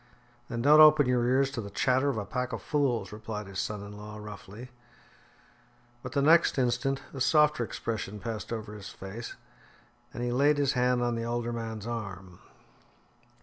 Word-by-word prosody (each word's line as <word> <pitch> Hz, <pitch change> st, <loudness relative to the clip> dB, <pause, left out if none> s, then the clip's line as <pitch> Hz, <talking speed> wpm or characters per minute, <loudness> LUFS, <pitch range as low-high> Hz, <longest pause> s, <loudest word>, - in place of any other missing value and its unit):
"Then 120 Hz, -1 st, -3 dB
don't 150 Hz, +3 st, +7 dB
open 155 Hz, -2 st, +8 dB
your 125 Hz, -1 st, +1 dB
ears 135 Hz, +2 st, +2 dB
to 130 Hz, -4 st, -4 dB
the 100 Hz, -, -7 dB
chatter 130 Hz, +7 st, +1 dB
of 130 Hz, -, -2 dB
a 105 Hz, -, -3 dB
pack 125 Hz, +4 st, -3 dB
of -, -, -5 dB
fools," 140 Hz, -6 st, 0 dB
replied 105 Hz, 0 st, -6 dB
his 95 Hz, -1 st, -6 dB
son 105 Hz, -1 st, -3 dB
in 100 Hz, 0 st, -9 dB
law 105 Hz, +1 st, -9 dB
roughly. 105 Hz, +3 st, -10 dB, 1.3 s
But 125 Hz, -, -7 dB
the 140 Hz, -1 st, +1 dB
next 165 Hz, +1 st, +5 dB
instant 130 Hz, +2 st, 0 dB
a 135 Hz, -, -6 dB
softer 150 Hz, 0 st, +4 dB
expression 105 Hz, -2 st, -4 dB
passed 110 Hz, -2 st, -5 dB
over 110 Hz, -2 st, -5 dB
his 105 Hz, -2 st, -9 dB
face, 100 Hz, +5 st, -8 dB, 0.8 s
and 120 Hz, -, -5 dB
he 120 Hz, -, -1 dB
laid 145 Hz, +4 st, +3 dB
his 140 Hz, -2 st, +2 dB
hand 125 Hz, -1 st, +2 dB
on 120 Hz, 0 st, 0 dB
the 115 Hz, 0 st, -3 dB
older 120 Hz, 0 st, -2 dB
man's 110 Hz, -2 st, -5 dB
arm. 100 Hz, -6 st, -6 dB
120 Hz, 180 wpm, -29 LUFS, 105-135 Hz, 1.3 s, open